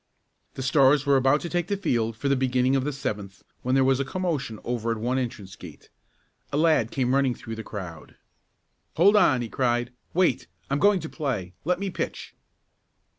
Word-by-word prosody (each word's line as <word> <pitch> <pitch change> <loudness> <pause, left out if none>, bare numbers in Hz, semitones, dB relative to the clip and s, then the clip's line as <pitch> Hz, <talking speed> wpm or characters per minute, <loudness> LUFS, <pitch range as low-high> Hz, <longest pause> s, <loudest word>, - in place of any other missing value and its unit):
The 130 - -4
Stars 140 +1 +4
were 140 -1 +4
about 135 +2 +3
to - - -4
take 175 0 -1
the 200 - -1
field 115 - -1
for 140 - -2
the 140 - +3
beginning 130 0 +1
of 135 - +1
the 150 - -1
seventh 105 -8 -5 0.2
when 130 +1 0
there 135 - +4
was 135 0 +3
a - - +1
commotion 140 -7 -3
over 120 -1 -2
at 115 - 0
one 125 +4 -1
entrance 105 -6 -5
gate. 80 -7 -13 0.6
A 140 - -1
lad 155 -8 +3
came 125 -1 0
running 135 -2 +2
through 115 - -8
the 110 - -5
crowd. 90 -8 -8 0.8
"Hold 195 +6 +5
on!" 130 -12 +4
he - - -4
cried. 120 0 -1 0.2
"Wait! 185 0 +2 0.2
I'm 140 - +1
going 200 0 +4
to 160 - -5
play. 130 - -3
Let 180 +1 +1
me 200 -1 -3
pitch!" - - -5
130 Hz, 195 wpm, -25 LUFS, 115-150 Hz, 0.8 s, Hold